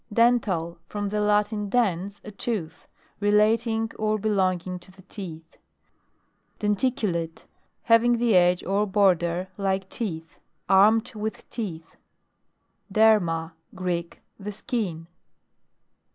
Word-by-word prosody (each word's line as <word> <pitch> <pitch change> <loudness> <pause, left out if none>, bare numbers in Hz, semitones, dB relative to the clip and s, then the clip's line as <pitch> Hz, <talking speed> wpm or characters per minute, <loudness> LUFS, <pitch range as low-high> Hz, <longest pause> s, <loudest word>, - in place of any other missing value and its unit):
DENTAL. 205 -8 +2
From 205 -1 -3
the 210 +1 -1
Latin, 210 0 +1
dens, 200 -4 0
a 210 - -8
tooth. 195 -6 -4 0.3
Relating 220 +2 +2
or 215 0 +1
belonging 185 -4 0
to 175 - -18
the 190 0 -17
teeth. 170 -5 -9 1.0
DENTICULATE. 205 -6 -1 0.4
Having 235 +1 +4
the 230 -3 +2
edge 180 0 +4
or 200 +3 +1
border 185 -2 +2
like 190 -1 0
teeth. 165 -8 -5 0.3
Armed 215 +5 +4
with 215 0 -5
teeth. 170 -9 -6 0.9
DERMA. 180 -7 +3 0.2
Greek. 175 -2 -3 0.2
The 205 +1 -5
skin. 200 -6 -3
200 Hz, 105 wpm, -25 LUFS, 180-215 Hz, 1.0 s, Having